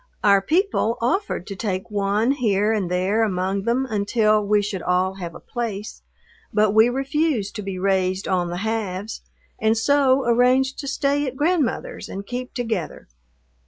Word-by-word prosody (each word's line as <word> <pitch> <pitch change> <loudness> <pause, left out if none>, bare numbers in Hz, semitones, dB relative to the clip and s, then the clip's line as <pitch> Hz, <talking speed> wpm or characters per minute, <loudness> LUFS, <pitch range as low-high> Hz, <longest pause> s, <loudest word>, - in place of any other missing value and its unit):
Our 200 -1 +5
people 315 - +1
offered 335 - -1
to 200 - -6
take 190 -1 -3
one 205 +4 +1
here 215 -5 +1
and 200 -5 -1
there 185 +5 +1
among 195 -1 -1
them 245 +3 +1
until 215 0 +2
we 205 0 +2
should 195 -3 -4
all 180 +1 +1
have 170 -2 -6
a - - -9
place, 220 -4 -5 0.5
but 210 -1 +3
we 220 +2 +6
refused 270 -4 -1
to - - -4
be 195 -2 -5
raised 190 0 0
on 180 -2 0
the 175 - -4
halves 215 -2 -3 0.4
and 220 +1 +2
so 270 +1 +3
arranged 255 +3 +3
to 280 - -5
stay 280 +1 0
at 255 - -5
Grandmother's 305 -4 -1
and 195 +1 -6
keep 250 +3 -6
together. 225 - -4
215 Hz, 160 wpm, -22 LUFS, 195-250 Hz, 0.5 s, we